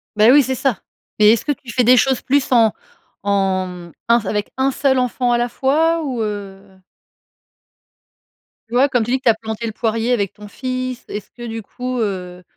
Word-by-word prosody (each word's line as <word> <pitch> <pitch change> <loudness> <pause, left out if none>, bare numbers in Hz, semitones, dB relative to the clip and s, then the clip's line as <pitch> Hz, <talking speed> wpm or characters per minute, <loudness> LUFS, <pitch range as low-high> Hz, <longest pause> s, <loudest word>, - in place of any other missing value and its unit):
Bah 215 +2 +5
oui, 285 +1 +7
c'est 260 0 -2
ça. 260 -3 0 0.4
Mais, 210 0 +7
est-ce 230 - -1
que 295 - 0
tu 260 -4 -6
fais 250 - +2
des 250 +2 +6
choses 265 +1 +2
plus 280 0 0
en 230 -3 +5 0.5
en 185 -3 -1 0.2
un 235 +1 +5
s 220 - -10
avec 210 0 -2
un 265 +1 +1
seul 270 0 +1
enfant 250 0 0
à - - +3
la 240 0 0
fois 320 +7 +1
ou, 255 -5 -3
heu? 200 -2 -6 1.9
Tu 230 - -13
vois, 265 +4 +4
comme 245 -3 +1
tu 235 - -4
dis 260 - +3
que - - -37
tu - - +6
as 225 - +4
planté 220 +1 -5
le 220 - -5
poirier 225 +1 -1
avec 200 -6 0
ton 210 0 -12
fils. 255 +2 -4
Est-ce 210 -1 -7
que 240 0 -9
du 225 -1 -5
coup, 250 +4 -5
heu, 180 -4 -4
235 Hz, 210 wpm, -19 LUFS, 210-255 Hz, 1.9 s, oui